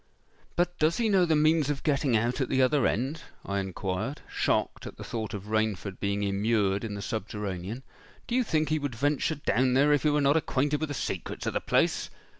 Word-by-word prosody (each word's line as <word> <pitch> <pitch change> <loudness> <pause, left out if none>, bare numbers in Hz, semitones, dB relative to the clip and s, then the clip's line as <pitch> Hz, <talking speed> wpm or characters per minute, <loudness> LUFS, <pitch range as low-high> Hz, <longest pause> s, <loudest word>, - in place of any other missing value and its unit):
—'But 175 0 0
does 155 +2 +3
he 230 -2 +1
know 190 -3 +4
the 160 -2 +2
means 155 -1 +3
of 145 -2 -2
getting 140 -5 +2
out 120 +5 0
at 130 - -1
the 130 - +1
other 130 +1 +4
end?' 135 +8 -1 0.2
I 100 0 -1
inquired, 95 - -3
shocked - - -1
at - - -10
the - - -7
thought 110 -3 -4
of 100 - -6
Rainford 105 -3 -1
being 100 0 -1
immured 100 0 +1
in 105 -2 -4
the 100 - -5
subterranean.—'_Do 105 - -6
you 255 +1 +3
think 155 -7 0
he 155 0 +1
would 140 -4 -3
venture 145 +5 +1
down 130 -3 +1
there 145 +2 +5
if 145 - +3
he 150 - +3
were 150 0 +2
not 140 +2 +4
acquainted 145 -1 0
with 155 - -2
the 145 - -3
secrets - - -4
of - - -1
the - - 0
place? - - +1
130 Hz, 215 wpm, -28 LUFS, 105-150 Hz, 0.2 s, there